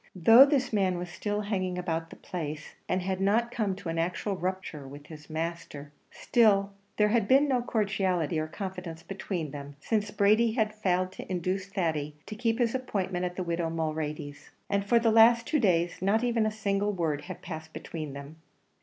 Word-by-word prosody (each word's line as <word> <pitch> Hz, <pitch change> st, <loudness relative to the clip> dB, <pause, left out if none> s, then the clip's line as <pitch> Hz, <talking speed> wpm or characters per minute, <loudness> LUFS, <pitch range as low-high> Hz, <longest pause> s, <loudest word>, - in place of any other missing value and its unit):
Though 225 Hz, -, +8 dB
this 265 Hz, -4 st, 0 dB
man 190 Hz, -3 st, +2 dB
was 175 Hz, 0 st, -5 dB
still 205 Hz, +4 st, -2 dB
hanging 185 Hz, -3 st, -2 dB
about 165 Hz, -2 st, -2 dB
the -, -, -11 dB
place, 155 Hz, -3 st, -6 dB, 0.2 s
and 185 Hz, 0 st, 0 dB
had 190 Hz, 0 st, -2 dB
not 225 Hz, +5 st, +2 dB
come 210 Hz, -5 st, -1 dB
to 190 Hz, -3 st, -7 dB
an 165 Hz, 0 st, -2 dB
actual 180 Hz, +4 st, -1 dB
rupture 180 Hz, -6 st, -4 dB
with 145 Hz, +2 st, -11 dB
his 150 Hz, -1 st, -12 dB
master, 160 Hz, -3 st, -5 dB, 0.2 s
still 200 Hz, -4 st, +2 dB, 0.2 s
there 210 Hz, 0 st, +4 dB
had 220 Hz, -2 st, +2 dB
been 275 Hz, +4 st, +5 dB
no 255 Hz, -3 st, +2 dB
cordiality 190 Hz, -8 st, 0 dB
or 155 Hz, -, -2 dB
confidence 180 Hz, -2 st, -6 dB
between 180 Hz, -6 st, -4 dB
them 145 Hz, 0 st, -8 dB
since 210 Hz, +4 st, -1 dB
Brady 215 Hz, +3 st, +3 dB
had 215 Hz, -3 st, 0 dB
failed 185 Hz, -3 st, 0 dB
to 190 Hz, -, -9 dB
induce 185 Hz, +2 st, -2 dB
Thady 160 Hz, -6 st, -2 dB
to -, -, -7 dB
keep 225 Hz, 0 st, 0 dB
his 235 Hz, -2 st, +1 dB
appointment 190 Hz, -8 st, -2 dB
at 180 Hz, 0 st, -4 dB
the 185 Hz, -, -2 dB
widow 170 Hz, -1 st, -1 dB
Mulready's; 155 Hz, -3 st, -4 dB, 0.2 s
and 200 Hz, 0 st, +2 dB
for 235 Hz, +4 st, +3 dB
the 230 Hz, -1 st, +3 dB
last 230 Hz, +1 st, +6 dB
two 300 Hz, 0 st, +1 dB
days 175 Hz, -7 st, +1 dB
not 205 Hz, +5 st, +2 dB
even 235 Hz, -3 st, +2 dB
a -, -, -1 dB
single 205 Hz, -1 st, 0 dB
word 160 Hz, -6 st, -2 dB
had 185 Hz, -, -8 dB
passed 160 Hz, -2 st, -7 dB
between 155 Hz, -4 st, -6 dB
them. 140 Hz, +3 st, -9 dB
185 Hz, 190 wpm, -28 LUFS, 165-215 Hz, 0.2 s, Though